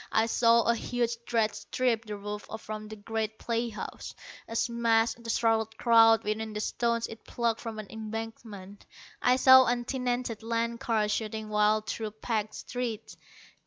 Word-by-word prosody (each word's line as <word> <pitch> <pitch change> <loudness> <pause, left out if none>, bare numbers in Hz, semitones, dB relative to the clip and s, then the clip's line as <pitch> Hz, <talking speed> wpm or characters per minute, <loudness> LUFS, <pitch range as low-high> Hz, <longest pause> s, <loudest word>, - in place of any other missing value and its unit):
I 220 - +3
saw 230 0 +4
a 235 - +3
huge 235 0 -1
dredge 225 -3 +1
strip 235 -3 -1
the 210 -1 -5
roof 205 +1 -6
from 215 -1 -7
a 215 - -7
great 220 +1 -3
playhouse, 230 -2 -4 0.3
and 230 - -4
smash 230 -1 +2
the 235 0 -11
startled 225 -1 +1
crowd 225 -2 +6
within 215 +1 -3
with 210 - -2
stones 235 -1 0
it 225 - -10
plucked 235 -2 -1
from 225 -2 -6
an 215 - -6
embankment. 220 -2 -7 0.3
I 250 - +4
saw 260 0 +8
untenanted 245 -1 -1
land 230 +1 -2
cars 215 -2 0
shooting 215 0 -3
wild 210 0 +2
through 220 0 -3
packed 215 -2 -2
streets. 235 -3 -5
225 Hz, 155 wpm, -29 LUFS, 215-235 Hz, 0.3 s, saw